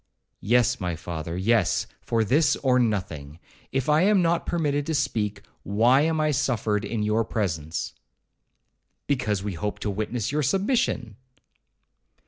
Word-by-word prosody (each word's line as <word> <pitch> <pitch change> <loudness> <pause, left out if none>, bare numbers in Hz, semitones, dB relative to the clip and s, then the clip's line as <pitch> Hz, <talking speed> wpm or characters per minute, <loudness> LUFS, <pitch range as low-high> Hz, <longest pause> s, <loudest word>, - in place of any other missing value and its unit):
'Yes, 125 +3 +2
my 90 -3 -2
father,—yes, 85 +6 0 0.2
for 115 -1 0
this 145 +6 +3
or 130 -2 +4
nothing. 90 - -2 0.3
If 135 +1 -1
I 150 +1 +4
am 200 +1 +4
not 170 0 +1
permitted 145 -4 0
to 160 - 0
speak, 105 -6 -1 0.2
why 115 +7 +3
am 160 +1 +1
I 155 0 +2
suffered 110 -6 0
in 105 0 -2
your 105 +2 +1
presence?' 80 -8 -3 1.1
'Because 105 -8 -1
we 105 -1 -3
hoped 105 +5 -4
to 105 - -1
witness 110 +4 -2
your 150 +1 0
submission.' 190 - 0
115 Hz, 135 wpm, -25 LUFS, 100-145 Hz, 1.1 s, or